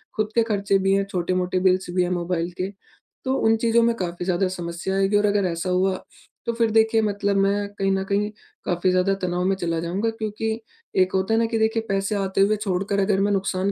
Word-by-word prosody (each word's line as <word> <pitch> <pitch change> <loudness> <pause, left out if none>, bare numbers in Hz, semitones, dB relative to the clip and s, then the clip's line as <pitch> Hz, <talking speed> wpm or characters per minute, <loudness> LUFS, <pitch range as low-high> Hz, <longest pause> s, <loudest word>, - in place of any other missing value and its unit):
खुद 215 0 0
के 230 - +5
खर्चे 200 -3 +1
भी 195 0 +2
हैं, 195 0 +2
छोटे-मोटे 185 +1 0
बिल्स 185 0 +2
भी 180 - +3
हैं 175 - -1
मोबाइल 175 -1 -1
के। 190 - -1 0.6
तो 260 - +1
उन 225 0 +5
चीज़ों 230 +1 +3
में 235 0 +2
काफ़ी 175 -3 -4
ज़्यादा 185 +1 +1
समस्या 175 +1 -4
आएगी 195 +1 +2
और 205 - +2
अगर 205 -1 +2
ऐसा 170 +2 -3
हुआ 185 +1 +2 0.5
तो 235 - -1
फिर 230 -1 +1
देखिए 225 0 +4
मतलब 200 -1 0
मैं 200 +1 +1
कहीं 195 0 +2
न 190 0 0
कहीं 205 +1 +1 0.4
काफ़ी 180 +1 +1
ज़्यादा 185 +2 +2
तनाव 180 0 -1
में 195 +1 +2
चला 170 -3 -1
जाऊँगा। 190 +7 -1
क्योंकि 220 0 -3 0.4
एक 185 0 +1
होता 190 +3 +1
है 225 - +3
ना 230 - +2
कि 225 - -1
देखिए 220 +1 +1
पैसे 195 +2 0
आते 195 -1 0
हुए 210 +2 +4
छोड़कर 200 0 -1
अगर 195 0 +2
मैं 205 +1 +2
नुकसान 195 0 0
195 Hz, 225 wpm, -23 LUFS, 185-215 Hz, 0.6 s, के